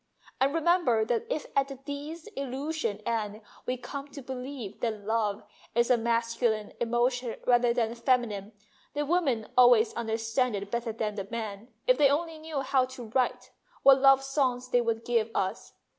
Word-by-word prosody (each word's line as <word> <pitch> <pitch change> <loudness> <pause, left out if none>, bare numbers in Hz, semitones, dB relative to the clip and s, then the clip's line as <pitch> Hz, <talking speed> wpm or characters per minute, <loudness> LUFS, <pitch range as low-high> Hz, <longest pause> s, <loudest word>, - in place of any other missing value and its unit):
And 270 +1 +3
remember 330 -8 +2
that 230 0 -1
if 305 - -2
at 275 0 +3
the 275 - -7
disillusioned 285 - -5
end 220 -2 -2 0.3
we 255 - -1
come 275 +3 -7
to 280 -1 -10
believe 255 -4 -6
that 215 -3 -3
love 215 -2 0 0.3
is 235 +1 +3
a - - +7
masculine 230 -1 0
emotion 240 +1 0
rather 245 -1 +4
than 230 -1 0
feminine, 235 -4 0 0.4
the 295 0 0
women 280 -9 +1
always 245 -3 +6
understand 225 +1 -1
it 200 0 -5
better 235 -1 -1
than 215 -1 -2
the 195 -2 -5
men. 220 -2 -5 0.2
If 255 +2 +4
they 285 -2 +6
only 320 +2 -1
knew 310 -3 -3
how 265 -1 +2
to 255 -3 -9
write, 255 0 0 0.3
what 270 -1 +7
love 270 0 +6
songs 260 -2 0
they 245 - +4
would 230 -1 -2
give 230 -2 +1
us 190 0 -2
245 Hz, 165 wpm, -29 LUFS, 225-275 Hz, 0.4 s, a